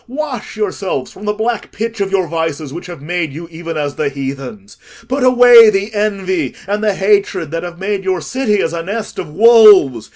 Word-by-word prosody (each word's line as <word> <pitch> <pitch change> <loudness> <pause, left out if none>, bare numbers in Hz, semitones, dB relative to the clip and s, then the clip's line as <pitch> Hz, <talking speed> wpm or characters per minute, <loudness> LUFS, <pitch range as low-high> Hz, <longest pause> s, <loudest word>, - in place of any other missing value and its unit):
Wash 265 -4 -6
yourselves 190 -9 -3
from 205 - -12
the 210 - +1
black 225 +3 -3
pitch 225 0 -5
of 195 - -1
your 190 -2 +1
vices, 160 -3 -4
which 170 - -8
have 170 -5 -10
made 170 -1 -3
you 165 +4 -9
even 165 0 -6
as 145 -1 -3
the 150 -2 -1
heathens: 140 +10 -7 0.3
put 260 +2 -2
away 245 -3 +7
the 200 +1 -2
envy 190 - -2
and 205 +2 -3
hatred 200 -6 0
that 165 0 -3
have 175 0 -8
made 195 +1 -3
your 190 -1 -1
city 210 - -1
as 165 - -2
a 170 - -3
nest 205 +6 -5
of 165 - -6
wolves. 205 - +5
195 Hz, 195 wpm, -15 LUFS, 165-215 Hz, 0.3 s, away